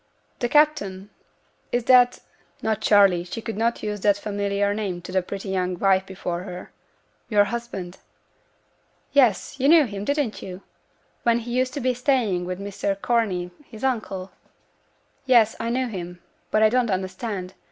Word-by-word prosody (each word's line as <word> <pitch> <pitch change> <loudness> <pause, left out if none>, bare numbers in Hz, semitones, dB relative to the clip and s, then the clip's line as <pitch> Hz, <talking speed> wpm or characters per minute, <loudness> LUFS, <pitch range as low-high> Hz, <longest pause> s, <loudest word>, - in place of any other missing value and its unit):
'The 240 - -1
captain! 225 -11 +2 0.6
is 240 0 0
that' 250 0 +5 0.4
(not 220 -1 0
'Charley', 195 -4 +5
she 180 +5 -6
could 225 0 -5
not 230 +2 0
use 210 -1 -3
that 205 0 +3
familiar 200 0 -1
name 200 -4 -3
to 175 +1 -9
the 185 0 +2
pretty 195 +2 -6
young 185 -1 -1
wife 190 0 +2
before 180 -2 -4
her) 180 -1 -8 0.6
'yo'r 205 -3 +5
husband?' 205 -5 -5 1.1
'Yes, 255 -1 +2
you 265 - +2
knew 320 -2 +7
him, 200 -4 -6
didn't 285 -2 -1
you? 185 +1 -8 0.6
when 235 0 +3
he 240 0 -6
used 255 +1 0
to - - -2
be 255 -1 +1
staying 240 -8 +1
with 180 +1 -4
Mr 200 0 -3
Corney, 195 -7 0
his 220 -2 -12
uncle?' 205 -7 -2 1.0
'Yes, 230 -4 +5
I 230 - -2
knew 255 +2 0
him; 180 -5 -7 0.3
but 215 - +3
I 215 - +6
don't 245 0 +1
understand. 190 0 -3
205 Hz, 160 wpm, -24 LUFS, 190-240 Hz, 1.1 s, knew